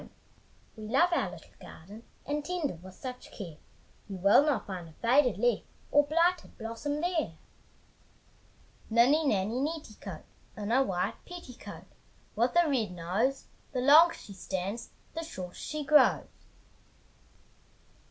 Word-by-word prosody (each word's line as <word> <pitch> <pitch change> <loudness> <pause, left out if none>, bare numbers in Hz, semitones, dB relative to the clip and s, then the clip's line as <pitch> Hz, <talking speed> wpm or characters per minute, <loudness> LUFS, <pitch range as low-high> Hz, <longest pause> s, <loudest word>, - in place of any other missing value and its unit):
We 215 -1 -8
love 335 +10 +3
our - - +1
little - - -13
garden, 205 +8 -12 0.2
And 295 +1 -2
tend 350 -4 -2
it 165 - -11
with 185 0 -12
such 250 +2 -8
care, 170 -7 -8 0.5
You 195 - -5
will 200 +9 +6
not 295 -3 0
find 180 -4 -6
a - - -16
faded 245 - +3
leaf 240 0 +2 0.3
Or 290 0 +5
blighted 335 +3 +1
blossom 235 +6 -4
there. 330 - -1 1.5
Ninny 250 +8 +5
nanny 210 +1 +1
netticoat, 295 -6 -5 0.3
In 210 +1 -3
a 260 +3 +5
white 185 -9 -2
petticoat, 345 -9 -10 0.5
With 240 +6 +1
a 345 -1 +5
red 235 -10 0
nose, 195 +11 -1 0.3
The 255 - 0
longer 310 +6 +7
she 200 - -11
stands, 190 +4 -4 0.2
The 330 - -3
shorter 185 - -7
she 305 0 -5
grows. 300 +1 +3
250 Hz, 135 wpm, -30 LUFS, 200-300 Hz, 1.5 s, longer